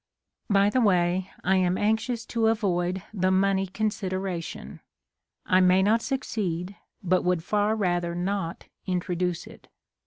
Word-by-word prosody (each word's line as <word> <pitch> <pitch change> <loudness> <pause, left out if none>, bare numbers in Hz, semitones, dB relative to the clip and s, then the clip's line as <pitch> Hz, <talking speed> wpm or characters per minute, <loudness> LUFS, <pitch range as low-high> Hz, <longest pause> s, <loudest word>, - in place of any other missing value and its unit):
By 200 0 +4
the 255 - +2
way, 185 -2 +2
I 190 +1 +3
am 185 0 +2
anxious 225 +2 0
to 225 -2 0
avoid 185 -5 0
the 185 -3 +1
money 195 0 +2
consideration. 190 -3 -4 0.7
I 185 - +4
may 185 +1 +5
not 220 +3 +3
succeed, 200 -9 -3 0.3
but 185 0 +2
would 180 -2 +1
far 210 +3 +1
rather 175 -4 0
not 180 -1 -3 0.2
introduce 180 -1 -1
it. - - -15
190 Hz, 130 wpm, -26 LUFS, 180-210 Hz, 0.7 s, may